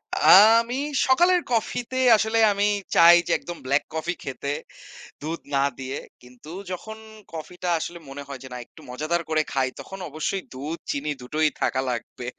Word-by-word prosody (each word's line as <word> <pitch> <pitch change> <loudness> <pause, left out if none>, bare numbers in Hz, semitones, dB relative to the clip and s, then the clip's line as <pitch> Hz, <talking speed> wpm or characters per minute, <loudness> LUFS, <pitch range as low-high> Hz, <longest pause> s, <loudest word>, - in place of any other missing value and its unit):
আ - - +3 0.3
আমি 240 +2 -4 0.3
সকালের 350 +7 +4
কফিতে 245 +2 -1 0.2
আসলে 220 +1 +1
আমি 200 +1 +1 0.3
চাই 170 +1 +9
যে - - -1
একদম 175 -1 -8
ব্লাক 140 +2 +2
কফি 160 +2 -2
খেতে, - - -4 0.7
দুধ 160 +3 -4 0.2
না 135 - +3 0.2
দিয়ে। 135 +1 -4 0.2
কিন্তু 125 +4 -15 0.2
যখন 220 +4 -6 0.4
কফি 165 +2 -7
টা 180 - 0
আসলে 170 +2 -6
মনে 140 +1 -7
হয় 140 -2 -7
যে - - -9
না 125 - -5
একটু - - -18
মজাদার 155 +7 -1
করে 155 -1 +2
খাই 130 -1 +1
তখন 195 0 -9
অবশ্যই 155 +6 -3
দুধ 145 +6 -5
চিনি 145 +1 -2
দুটোই 155 +5 +1
থাকা 130 - +1
লাগবে। 120 0 -5
155 Hz, 170 wpm, -24 LUFS, 135-195 Hz, 0.7 s, চাই